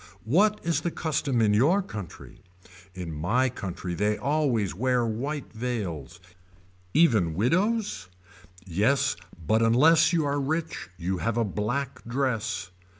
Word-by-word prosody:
What 205 - +3
is 170 0 0
the 175 - -1
custom 145 -8 0
in 105 -1 +3
your 160 - +3
country. 105 - -9 0.5
In 90 -3 -5
my 110 +13 +1
country 95 -6 -5
they 105 +4 0
always 135 - 0
wear 125 +4 +1
white 135 +6 -4
veils. 95 - -4 0.8
Even 110 - +4
widows. 185 - 0 0.6
Yes 120 +10 +1 0.3
but 110 +8 +3
unless 155 +9 +5
you 165 -3 +1
are 145 0 0
rich 155 - -3
you 90 +1 -2
have 115 +4 -1
a 115 - +2
black 120 +7 -3
dress. 115 -6 -2
120 Hz, 130 wpm, -27 LUFS, 105-145 Hz, 0.8 s, unless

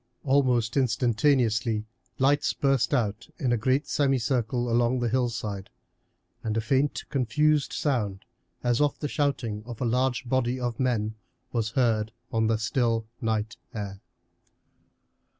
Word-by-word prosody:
Almost 130 -4 +2
instantaneously 115 -2 +2 0.3
lights 140 +2 +3
burst 135 -5 +1
out 110 -5 0
in 125 - 0
a - - +4
great 130 +5 +1
semicircle 125 -3 +1
along 120 +2 +2
the 120 -1 0
hillside, 115 -5 -2 0.7
and 110 0 -1
a - - +3
faint 135 +6 +1
confused 150 +3 +2
sound, 105 -10 -1 0.4
as 120 +2 +2
of 145 -2 +2
the 150 - -3
shouting 135 -8 -1
of 120 -3 -7
a 125 - -1
large 125 +2 0
body 130 0 +1
of 120 -2 -3
men, 115 -5 0 0.4
was 115 -3 0
heard 110 -4 +2 0.2
on 110 -1 +2
the 110 0 +2
still 115 0 0 0.2
night 110 -1 -1 0.2
air. 100 -2 -5
120 Hz, 130 wpm, -27 LUFS, 110-130 Hz, 0.7 s, a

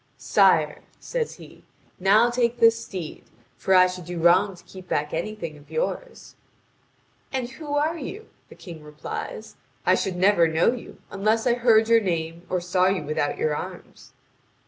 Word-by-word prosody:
"Sire," - - +3 0.2
says 485 -2 -3
he, - - -15 0.4
"now 210 +6 +4
take 240 0 0
this 230 -1 +4
steed, 180 -5 -7 0.3
for 190 - +1
I 185 0 +7
should 180 -1 -5
do 175 +1 -6
wrong 180 +4 +4
to 175 - -17
keep 185 -1 -13
back 150 0 -1
anything 170 -2 -4
of 145 - -20
yours." - - -4 1.0
"And 260 -3 -2
who 290 +2 -6
are 315 +3 0
you?" 415 +10 -7 0.2
the - - -13
King 165 -4 -11
replies; 150 0 -7 0.3
"I - - +5
should 190 -2 -1
never 180 -2 +4
know 160 +6 +2
you, 250 - -10
unless 215 +4 0
I 245 - +4
heard 230 -2 +4
your 230 0 +5
name, 170 -2 -3
or 185 - 0
saw 180 +1 +1
you 190 -4 0
without 145 -1 -2
your 155 -1 0
arms." - - -9
190 Hz, 170 wpm, -24 LUFS, 170-235 Hz, 1.0 s, I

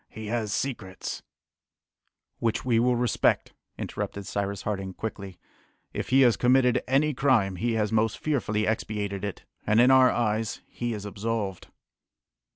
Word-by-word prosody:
"He 110 0 -8
has 110 -3 -1
secrets 110 -7 -4 0.6
" - - -54
"Which 115 +1 -1
we 120 -3 +3
will 125 +1 +3
respect," 120 -2 +1 0.2
interrupted 100 -1 -5
Cyrus 100 +1 -3
Harding 95 -2 -3
quickly. 100 -4 -6 0.6
"If - - -4
he 135 +1 +5
has 120 -6 +5
committed 125 +1 +3
any 145 +4 +2
crime, 120 -9 +2
he 115 +5 0
has 105 -1 0
most 110 -1 +1
fearfully 110 -8 0
expiated 105 -2 -2
it, 100 -2 -5 0.2
and 105 +2 +3
in 125 +2 +6
our 130 -1 +7
eyes 110 -2 -1
he 120 -1 -4
is 105 -1 -7
absolved." 105 -2 -3
110 Hz, 150 wpm, -27 LUFS, 100-125 Hz, 0.6 s, our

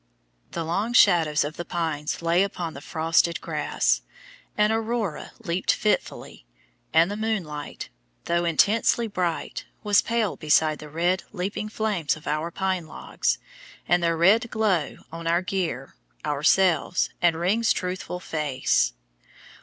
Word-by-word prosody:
The 165 - -2
long 200 +9 -1
shadows 165 -9 +5
of 150 +2 -5
the 175 - -3
pines 160 -3 -3
lay 170 +2 +3
upon 180 -4 -2
the 140 - -9
frosted 165 +2 +1
grass, 145 - 0 0.6
an 210 +1 +3
aurora 225 -5 -2
leaped 185 -5 0
fitfully, 210 - -2 0.5
and 165 +4 +4
the - - -3
moonlight, 195 -10 -4 0.4
though 170 0 +1
intensely 210 +8 +3
bright, 180 -5 -3 0.2
was 205 -1 +4
pale 230 -3 0
beside 155 0 +2
the 150 - -9
red, 175 +4 0
leaping 205 +2 -3
flames 210 -8 -1
of 155 - -14
our 155 +3 -1
pine 185 -2 -2
logs - - -2 0.5
and 175 0 +3
their 165 -1 +1
red 215 +8 +4
glow 200 -10 0
on 165 0 -6
our 170 +2 +2
gear, 175 -9 -3 0.3
ourselves, 165 +5 +2
and 175 -2 +4
Ring's 215 +6 +2
truthful 180 0 -3
face. 135 - 0
175 Hz, 135 wpm, -25 LUFS, 160-200 Hz, 0.6 s, shadows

